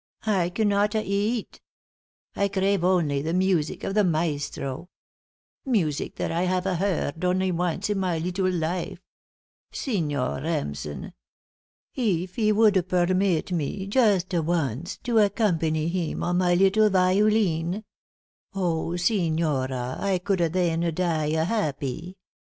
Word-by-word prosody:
I 190 -5 +1
cannot 205 +2 +1
eat. 215 +2 -1 0.7
I 200 - +1
crave 195 -1 0
only 170 -6 +2
the 160 +4 -2
music 185 -5 +1
of 195 - -2
the 210 0 +3
maestro 155 -2 -2 0.7
music 185 - -1
that - - -2
I 170 +2 0
hava 185 0 0
heard 175 -4 -1
only 185 +1 +1
once 180 +2 -1
in 205 -2 -1
my 180 -3 0
leetle 180 +3 -1
life. 180 +2 -2 0.7
Signor 150 - -2
Remsen! 75 - -4 0.8
Eef 185 -7 -1
he 215 -3 +2
would 215 0 +5 0.2
permeet 185 -1 +1
me 175 +3 -2
justa 195 -6 +2
once 160 -2 -2
to 235 -2 +2
accompany 165 -7 +1
him 170 -1 -2
on 175 0 +1
my 175 -1 +3
leetle 195 +4 +4
violin 190 -1 +2 0.7
oh, 170 -2 -1
signora, 155 - 0
I 195 -2 +1
coulda 180 -2 0
then 170 -1 0 0.2
die 160 -4 0
happy. 165 - -3
180 Hz, 120 wpm, -25 LUFS, 160-200 Hz, 0.8 s, would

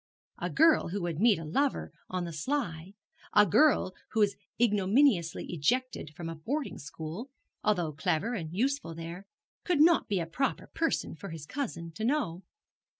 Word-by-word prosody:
A - - -2
girl 325 0 +4
who 190 +2 -3
would 170 -2 -2
meet 225 -2 +5
a 165 - -6
lover 275 - 0 0.2
on 185 -1 -2
the 170 - -6
sly, 175 - -3 0.4
a 210 0 +7
girl 225 - +4 0.2
who 220 - 0
was 200 -1 +3 0.2
ignominiously 210 - +3
ejected 180 - 0
from 170 -1 -6
a 165 - -4
boarding 260 - -3
school, 160 - -7 0.3
although 180 -7 +1
clever 155 +10 0
and 165 -8 -4
useful 245 - -1
there, 170 +4 -7 0.4
could 355 -5 +1
not 330 +2 +5
be 200 -2 +1
a 165 - -1
proper 260 +12 -1
person 325 -1 0
for 170 +5 -8
his 160 -3 -7
cousin 190 - -4
to 215 +7 -6
know. 230 - 0
195 Hz, 165 wpm, -30 LUFS, 165-260 Hz, 0.4 s, a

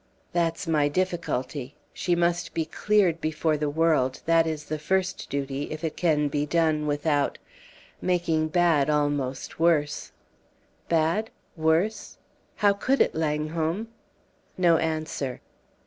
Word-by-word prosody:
"That's 170 -1 0
my 155 -3 +2
difficulty. 145 -6 -2 0.2
She 175 - 0
must 170 0 0
be 160 - 0
cleared 185 -1 +1
before 155 0 0
the 150 0 -1
world. 150 -4 +1
That 165 0 +4
is 155 -2 -3
the 155 0 -4
first 190 +4 -1
duty 140 0 -3
if 155 +1 -6
it 160 -1 -2
could 150 -4 +1
be 145 +1 -1
done 155 -1 +1
without 145 -1 0 0.6
making 170 -3 +1
bad 160 -3 +3
almost 145 -3 -1
worse!" 160 -3 +1 0.8
"Bad 165 +7 +1 0.3
worse? 170 +7 0 0.4
How 205 -1 +4
could 260 +7 0
it, - - +3
Langholm?" 160 +6 -1 0.7
No 170 -3 +4
answer. 155 -5 -2
160 Hz, 125 wpm, -26 LUFS, 150-170 Hz, 0.8 s, That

